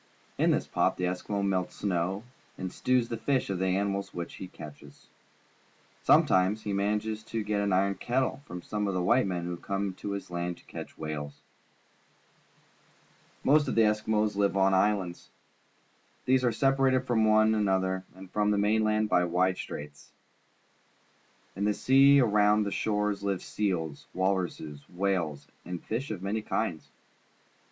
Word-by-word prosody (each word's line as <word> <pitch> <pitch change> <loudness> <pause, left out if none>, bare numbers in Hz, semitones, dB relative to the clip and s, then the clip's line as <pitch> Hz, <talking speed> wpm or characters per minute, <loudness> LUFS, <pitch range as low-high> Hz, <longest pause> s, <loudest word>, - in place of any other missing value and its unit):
In - - +4
this - - +1
pot - - +1
the 90 - -3
Eskimo 95 +3 -1
melts 95 -2 -1
snow 95 +1 -1 0.3
and 95 -1 -4
stews 125 -2 +1
the 115 - -4
flesh 130 -2 0
of 95 - -2
the 95 - +1
animals 100 +1 -1
which 85 -1 -5
he 95 - -7
catches. 75 -4 -13 0.9
Sometimes 95 +4 +4
he 105 - -2
manages 105 +2 -1
to 115 -1 -3
get 105 0 -1
an 100 -1 0
iron 95 +1 +2
kettle 130 +7 -1
from 90 0 -7
some 105 -1 -2
of 100 - -1
the 90 - 0
white 120 +4 +3
men 90 -2 -3
who 90 0 -4
come 100 +1 -3
to 100 - -4
his 100 -3 -6
land 85 0 -3
to - - -19
catch - - -9
whales. 75 -2 -6 2.0
Most 150 +1 +4
of - - -1
the 115 - +5
Eskimos 105 0 +1
live 100 -1 +1
on 95 0 +4
islands. 95 -2 0 1.0
These 130 0 +3
are 120 - +3
separated 135 +1 +2
from 120 -3 +2
one 110 0 +4
another 95 -3 +1
and 95 0 -12
from 105 0 +1
the 105 - +2
mainland 110 +1 +2
by 90 -4 +3
wide 90 +2 +1
straits. 75 0 -8 1.4
In 100 - -3
the 105 0 +1
sea 135 +2 +6
around 105 -3 +4
their 100 - -3
shores 105 -1 -1
live 100 -2 -2
seals, 85 -8 -2
walruses, 90 -6 -1
whales, 90 -6 -1 0.2
and 90 0 -5
fish 120 +9 -4
of 100 -4 -5
many 105 +3 -1
kinds. 95 -6 -3
100 Hz, 160 wpm, -29 LUFS, 90-110 Hz, 2.0 s, sea